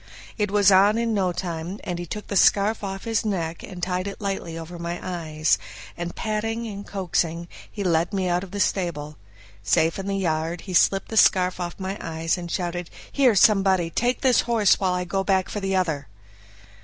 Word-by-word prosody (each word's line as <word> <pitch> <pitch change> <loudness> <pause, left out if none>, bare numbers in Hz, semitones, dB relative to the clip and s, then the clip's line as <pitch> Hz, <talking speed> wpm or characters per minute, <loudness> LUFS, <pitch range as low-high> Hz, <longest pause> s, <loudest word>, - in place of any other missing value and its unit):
It 210 -2 0
was 200 -1 +4
on 200 +3 +5
in 230 -1 0
no 190 -3 +1
time; 175 +1 -4
then 180 -3 -3
he 175 - -5
took 210 +5 -6
the 200 - -5
scarf 205 +3 +3
off 195 -1 -5
his 225 -1 0
neck, 170 -6 -2
and 180 -2 -9
tied 185 +1 -1
it 200 - -6
lightly 195 -5 -4
over 170 +1 -8
my 170 +1 -4
eyes, 160 -3 0 0.4
and 175 0 -5
patting 225 +2 -2
and 205 -2 -7
coaxing 170 -3 -1 0.2
he 205 - -4
led 170 -2 +1
me 190 -2 -1
out 175 +1 0
of 195 - -9
the 205 +2 -5
stable. 155 -7 -1 0.4
Safe 160 - +2
in 195 - -5
the 195 0 -1
yard, 165 -2 -1
he 185 - -7
slipped 195 +2 +3
the 220 - -3
scarf 185 -2 +4
off 175 -1 -4
my 190 +1 -4
eyes, 165 0 -1
and 175 -2 -7
shouted, 175 -1 -3 0.2
"Here 260 -6 +4
somebody! 190 -4 +4
take 245 +7 0
this 255 -3 +4
horse 225 -4 +3
while 185 -2 +1
I 180 - -1
go 195 +2 -1
back 190 -1 +1
for 210 - -3
the 195 -1 -1
other." 160 -7 -1
185 Hz, 205 wpm, -24 LUFS, 170-200 Hz, 0.4 s, on